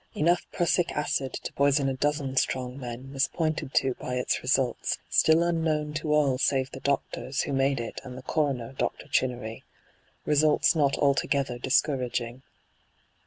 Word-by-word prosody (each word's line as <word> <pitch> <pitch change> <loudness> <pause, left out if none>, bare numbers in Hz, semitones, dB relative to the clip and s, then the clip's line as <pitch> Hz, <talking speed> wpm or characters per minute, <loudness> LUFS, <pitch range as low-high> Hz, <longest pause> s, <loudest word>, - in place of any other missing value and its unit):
Enough 170 +3 +2
prussio 175 +1 +2
acid 140 -2 -1
to - - -5
poison 140 0 +2
a 135 - 0
dozen 140 0 -1
strong 130 0 -1
men 125 +2 -7
was 135 -1 +2
pointed 155 -4 -2
to 135 -1 +3
by 125 - -4
its 125 - 0
results, 130 -1 0
still 160 +1 +4
unknown 160 -3 0
to 155 0 -2
all 140 -4 +3
save 135 -1 +1
the 135 - -8
doctors 140 -1 -1
who 140 - -3
made 135 0 +2
it 115 - -5
and 125 -2 -9
the 130 - -9
coroner, 135 -5 -1
Dr. - - -3
Chinneiy 120 -3 -1 0.3
— - - -38
results 150 +2 +3
not 145 -3 +2
altogether 140 -3 +1
discouraging. 125 -3 0
135 Hz, 160 wpm, -27 LUFS, 130-150 Hz, 0.3 s, still